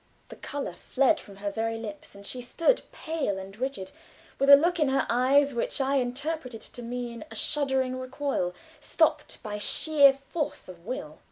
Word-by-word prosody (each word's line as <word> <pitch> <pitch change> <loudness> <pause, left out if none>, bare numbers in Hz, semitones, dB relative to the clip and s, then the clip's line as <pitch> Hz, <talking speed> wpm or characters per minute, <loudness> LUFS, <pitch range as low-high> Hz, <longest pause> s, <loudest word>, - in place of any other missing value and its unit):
The - - -9
color 285 -1 -5
fled 275 +4 +2
from 200 - -13
her 200 +1 -4
very 225 +2 -2
lips 210 -3 -8
and 200 0 -12
she 250 +4 -5
stood 335 - +2
pale 315 -11 -2
and 190 +1 -8
rigid 245 -5 -4 0.5
with 275 +1 +3
a 280 - +13
look 345 +5 +2
in 300 - +3
her 270 0 +2
eyes 275 +4 +4
which 235 - -2
I 275 +1 +2
interpreted 255 -1 -3
to 245 - -10
mean 240 0 -5
a - - -10
shuddering 265 -3 0
recoil, 255 -8 -2 0.2
stopped - - 0
by 210 -2 -4
sheer 285 +5 +5
force 280 +3 -5
of 180 0 -12
will. 155 -11 -5
255 Hz, 175 wpm, -28 LUFS, 225-280 Hz, 0.5 s, a